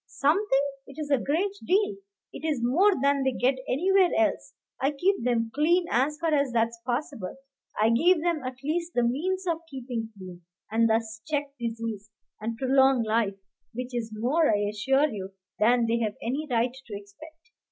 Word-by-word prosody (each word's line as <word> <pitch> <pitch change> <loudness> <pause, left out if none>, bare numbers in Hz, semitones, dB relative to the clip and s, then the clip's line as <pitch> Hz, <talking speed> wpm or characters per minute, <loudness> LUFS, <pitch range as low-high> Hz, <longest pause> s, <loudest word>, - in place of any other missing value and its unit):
"Something! 295 -1 +2 0.2
it 275 - -13
is 295 -1 -4
a 275 - +4
great 340 +10 0
deal; 400 +2 +1 0.4
it - - -9
is 305 -5 0
more 355 +12 +4
than 280 0 +3
they 265 -1 +1
get 260 +2 +1
anywhere 370 +6 +3
else. 330 -1 0 0.3
I 270 - +3
keep 370 +2 +1
them 230 -2 0
clean, 340 +5 +3
as 280 +5 +1
far 330 -2 0
as 280 -3 +2
that's 230 0 0
possible. 245 -5 -3 0.4
I 220 +2 +4
give 335 +9 +4
them 340 -3 0
at 255 0 -4
least 335 +4 -2
the 245 - +3
means 365 +11 -1
of 335 -2 0
keeping 245 -5 -5
clean, 180 -2 -10 0.3
and 230 +1 +3
thus 220 0 -1
check 290 -2 -1
disease, 225 -3 -4 0.3
and 225 +2 -4
prolong 265 -1 +4
life, 215 -2 +1 0.4
which 250 +1 -5
is 235 -2 -2
more, 255 +9 +2
I 205 -1 +1
assure 270 +8 +2
you, 195 -4 -6 0.3
than 235 +2 +4
they've 230 -2 0
any 275 +7 -3
right 240 0 +1
to 260 -6 -9
expect." 315 +12 -16
260 Hz, 175 wpm, -27 LUFS, 230-310 Hz, 0.4 s, a